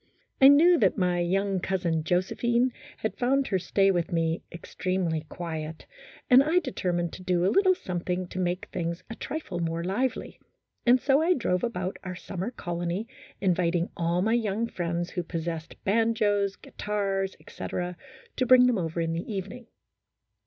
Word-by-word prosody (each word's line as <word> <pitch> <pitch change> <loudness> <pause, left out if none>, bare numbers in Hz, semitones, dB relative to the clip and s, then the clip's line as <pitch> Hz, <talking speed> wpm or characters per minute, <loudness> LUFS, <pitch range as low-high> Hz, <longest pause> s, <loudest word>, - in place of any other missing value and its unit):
I 265 - +10
knew 325 +5 +7
that 195 -6 +3
my 180 -2 +1
young 195 +2 +1
cousin 175 -4 -1
Josephine 235 +8 +1 0.2
had 220 -3 -4
found 270 +2 +2
her 190 - +1
stay 195 +2 +2
with 175 -3 -1
me 165 0 0
ex 170 - -11
tremely 170 -4 -1
quiet, 160 -2 -6 0.4
and 255 +1 +8
I 315 +5 +2
determined 180 - -1
to - - -8
do 180 -1 +1
a - - +2
little 375 -1 +4
some 180 - -4
thing 180 +1 -2
to 185 - -5
make 180 0 -1
things 170 0 -3
a - - -5
trifle 255 - -5
more 165 0 -2
lively, 225 +8 -2 0.5
and 250 +2 +6
so 275 +3 +3
I 350 +3 +3
drove 180 - 0
about 190 -5 -2
our 180 -1 -5
summer 190 +2 -5
colony 175 -2 -3 0.4
inviting 175 -2 +1
all 170 +1 0
my 220 +2 +2
young 225 -1 0
friends 175 -4 -3
who 180 - -2
possessed 165 -1 -5
banjos, 205 -2 +2
guitars, 195 -2 -3
etc., 180 0 -5 0.4
to 255 - +2
bring 255 0 +8
them 245 -5 +2
over 165 0 -2
in 165 0 -1
the 170 +6 -4
evening. 200 +4 -6
185 Hz, 165 wpm, -27 LUFS, 175-230 Hz, 0.5 s, I